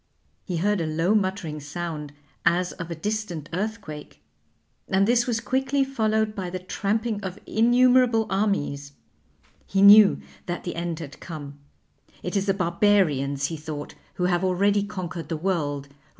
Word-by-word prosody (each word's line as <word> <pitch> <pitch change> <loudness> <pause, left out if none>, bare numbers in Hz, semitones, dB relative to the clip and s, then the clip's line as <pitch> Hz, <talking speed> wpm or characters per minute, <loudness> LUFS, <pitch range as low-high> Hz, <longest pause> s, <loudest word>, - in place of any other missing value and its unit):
He 180 -4 -3
heard 205 +2 +1
a 160 - -1
low 165 +6 +1
muttering 190 -7 -1
sound 150 0 -5 0.3
as 180 +1 +2
of 170 -1 -7
a 170 - -4
distant 180 -4 -4
earthquake, 190 -6 -5 0.7
and 195 +1 +2
this 240 +1 +3
was 230 -2 0
quickly 265 +3 0
followed 220 -5 0
by 190 -4 -4
the 185 - -4
tramping 205 +4 -2
of 190 0 -5
innumerable 245 0 +4
armies. 190 -9 -1 0.7
He 195 0 +2
knew 205 0 +8 0.3
that 175 -1 -3
the 175 - -4
end 170 -1 -3
had 150 -3 -9
come. 145 -4 -8 0.6
It 180 - -3
is 195 0 0
the 195 - +3
Barbarians, 170 -7 +2
he 165 - -5
thought, 150 -1 -6 0.2
who 180 - -2
have 180 0 +1
already 200 +2 +2
conquered 180 -5 -5
the 165 - -2
world. 150 -5 -1
185 Hz, 150 wpm, -25 LUFS, 160-210 Hz, 0.7 s, knew